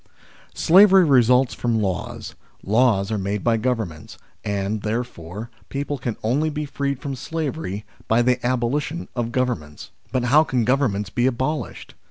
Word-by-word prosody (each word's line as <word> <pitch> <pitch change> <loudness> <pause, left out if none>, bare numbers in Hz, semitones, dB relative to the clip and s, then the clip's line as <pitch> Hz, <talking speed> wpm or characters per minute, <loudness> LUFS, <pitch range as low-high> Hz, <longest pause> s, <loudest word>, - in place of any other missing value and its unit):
SLAVERY 190 +1 +6
results 125 -2 +4
from 115 -2 0
laws, 95 -4 -3 0.3
laws 110 -2 +2
are 110 - -1
made 100 +1 -2
by 115 -1 +3
Governments, 110 - -3 0.3
and, 100 +1 -2
therefore, 110 -2 -5 0.2
people 140 0 -3
can 120 -3 -3
only 140 +8 +1
be 150 0 -3
freed 140 -1 -2
from 140 -1 -4
slavery 135 - -4 0.2
by 115 +2 +3
the 125 0 +1
abolition 130 +6 -1
of 120 -1 -2
Govern 125 -2 0
ments. 75 -1 -13 0.2
But 130 - 0
how 145 +6 +5
can 125 -7 0
Governments 110 -7 +1
be 120 +5 +1
abolished 130 +5 -3
120 Hz, 150 wpm, -22 LUFS, 105-140 Hz, 0.3 s, SLAVERY